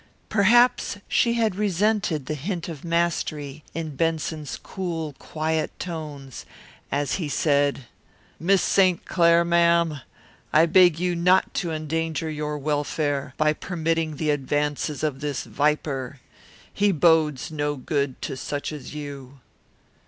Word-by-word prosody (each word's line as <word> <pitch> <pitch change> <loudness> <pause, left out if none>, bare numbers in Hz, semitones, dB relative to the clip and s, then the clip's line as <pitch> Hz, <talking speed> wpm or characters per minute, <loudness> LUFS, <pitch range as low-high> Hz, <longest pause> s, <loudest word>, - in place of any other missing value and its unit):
Perhaps 235 +2 +4
she 235 - +2
had 225 -3 +1
resented 205 -5 0
the 155 - -3
hint 170 +4 -4
of 160 -5 -7
mastery 155 -4 -1
in 160 -3 -4
Benson's 160 -2 -2
cool, 165 -5 -4
quiet 160 0 -2
tones 150 -6 -7 0.5
as 145 +2 0
he 165 -6 -3
said, 140 -3 +1 0.5
"Miss 190 +3 +3
St. 185 -3 +3
Clair, 170 -1 +4
ma'am, 170 -3 +3 0.5
I 160 +2 +6
beg 175 -1 +5
you 180 0 0
not 180 +2 +3
to 170 -3 -2
endanger 160 0 -2
your 150 0 -3
welfare 145 -1 -1
by 155 0 +3
permitting 165 -2 -2
the 150 +1 0
advances 145 +1 -1
of 145 -4 -1
this 145 -2 -3
viper. 140 -3 -1 0.5
He 205 0 +3
bodes 160 -4 +2
no 145 -1 -1
good 140 0 -2
to - - -3
such 145 +3 -4
as 150 -2 -8
you." 140 -2 -8
155 Hz, 130 wpm, -24 LUFS, 145-170 Hz, 0.5 s, I